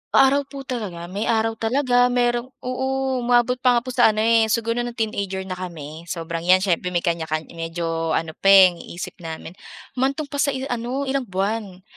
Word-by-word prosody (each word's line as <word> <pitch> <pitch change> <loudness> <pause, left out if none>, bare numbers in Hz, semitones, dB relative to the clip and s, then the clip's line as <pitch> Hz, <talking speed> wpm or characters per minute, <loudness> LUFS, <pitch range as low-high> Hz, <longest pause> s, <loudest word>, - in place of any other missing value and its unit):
Araw 275 +1 +4
po 280 -1 -8
talaga. 210 -10 -5
May 205 +4 -2
araw 225 0 +2
talaga, 245 +1 +3
merong 240 0 +1 0.2
oo. 265 +1 -1
Umabot 245 +1 +2
pa 250 -1 +4
nga 235 - +1
po 255 - -5
sa 245 -1 +5
ano, 215 - +1
eh, 225 -1 +4
siguro 230 +2 0
no’ng 240 0 -3
teenager 200 -4 -2
na 190 - -9
kami, 170 -3 -7
sobrang 165 -1 -4
‘yan, 185 +1 +5
siyempre 180 -1 0
may 170 - +1
kanya 170 -1 -1
kan 155 0 -2
medyo 165 -1 -2
ano 160 0 -1
pa, - - 0
eh, 190 -2 +9
ang 170 - -13
isip 175 +3 -8
namin. 165 -1 -7 0.5
Humantong 275 +3 0
pa 285 - -4
sa 280 -1 +2
i 260 - -4
ano, 245 +3 -2
ilang 270 -2 -2
buwan, 195 0 -3
225 Hz, 200 wpm, -22 LUFS, 180-250 Hz, 0.5 s, eh